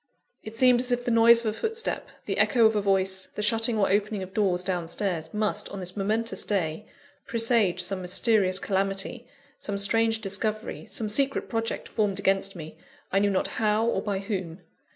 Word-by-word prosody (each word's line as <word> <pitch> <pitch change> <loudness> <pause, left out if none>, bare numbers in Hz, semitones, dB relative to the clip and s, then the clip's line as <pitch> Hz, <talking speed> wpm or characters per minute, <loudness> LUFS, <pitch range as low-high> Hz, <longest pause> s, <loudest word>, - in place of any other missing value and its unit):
It 220 +1 -9
seemed 250 0 +5
as 250 0 0
if 245 0 -1
the 245 - 0
noise 230 0 +6
of - - -10
a - - -12
footstep, 450 +1 -1 0.2
the - - -2
echo 235 -3 +4
of 220 0 +4
a 210 - +1
voice, 190 -1 0
the 210 - -2
shutting 225 +2 +2
or 200 - +2
opening 205 0 0
of 185 +1 -10
doors 185 -4 +1
down 180 -3 -2
stairs, 170 -3 -2
must, 210 -1 0
on 200 - -7
this 180 -1 -2
momentous 220 +3 -1
day, 190 -1 -2 0.4
presage 225 -6 +2
some 190 0 -2
mysterious 185 +1 +3
calamity, 195 +5 -2 0.3
some 200 -1 -3
strange 225 +3 +2
discovery, 215 +2 -3
some 220 0 -2
secret 275 +6 0
project 225 -1 -3
formed 205 -3 -1
against 195 0 0
me, 160 -2 -9 0.3
I 195 - +3
knew 205 0 +2
not 190 - 0 0.2
how, 215 +1 +2
or 235 - 0
by 205 -2 -2
whom. 190 -3 -5
205 Hz, 190 wpm, -26 LUFS, 190-225 Hz, 0.4 s, noise